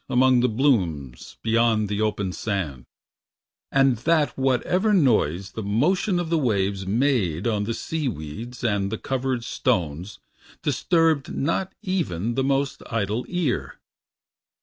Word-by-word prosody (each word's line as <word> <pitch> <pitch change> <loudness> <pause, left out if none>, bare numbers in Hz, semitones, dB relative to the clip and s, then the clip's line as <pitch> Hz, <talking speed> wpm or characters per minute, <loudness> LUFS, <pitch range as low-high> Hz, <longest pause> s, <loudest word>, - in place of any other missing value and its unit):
Among 130 0 +4
the 125 +1 +3
blooms 90 - 0
beyond 115 -1 +2
the 105 +1 -2
open 105 -3 -1
sand; 80 - -3 0.8
And 135 -3 +4
that 150 +1 +1
whatever 135 - +1
noise 105 - +2
the 110 - -5
motion 175 - +1
of 170 -2 -3
the 165 - +3
waves 100 -6 0
Made 105 - +1
on 105 -3 0
the 115 +1 -2
sea 160 -3 -3
weeds 115 - -6
and 100 -4 0
the 110 - -2
covered 130 -1 -2
stones 90 - -1 0.5
Disturbed 165 -5 +2
not 165 +6 -1
even 120 - -1
the 135 - 0
most 135 +1 0
idle 110 +1 -1
ear. 175 -8 -1
120 Hz, 130 wpm, -24 LUFS, 100-140 Hz, 0.8 s, Among